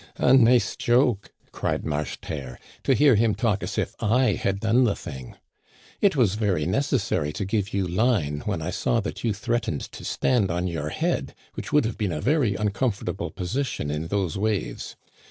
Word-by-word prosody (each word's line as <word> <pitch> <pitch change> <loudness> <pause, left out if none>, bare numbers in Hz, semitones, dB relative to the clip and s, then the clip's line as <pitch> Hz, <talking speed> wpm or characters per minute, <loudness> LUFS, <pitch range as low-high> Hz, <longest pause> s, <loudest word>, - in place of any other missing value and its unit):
A 125 - +4
nice 125 -1 +5
joke," 120 -4 +2 0.2
cried - - -2
Marcheterre; 75 -3 -4 0.3
"to 135 - +4
hear 145 -1 +5
him 110 0 +3
talk 105 -4 0
as - - -4
if - - -1
I 115 +1 +3
had 100 0 -1
done 115 +4 +3
the 110 -5 +2
thing! 65 -4 -8 0.7
It 200 -5 +4
was 115 -9 +3
very 100 -8 0
necessary 95 - 0
to 100 - -3
give 100 0 -1
you 100 -1 0
line 90 - +1
when - - -1
I - - -2
saw 115 - +1
that 105 - -6
you 115 - +1
threatened 110 - -1
to - - -10
stand 115 -7 +1
on 90 +1 -1
your 80 -4 -3
head, - - -2 0.2
which - - -6
would 150 -4 +4
have 115 - -4
been 105 -4 0
a - - -3
very 125 - +1
un 105 +1 +1
comfortable 100 -3 -2
position 95 - -3
in 75 +2 -3
those 95 -2 -1
waves. 105 -1 -2
105 Hz, 185 wpm, -25 LUFS, 90-120 Hz, 0.7 s, nice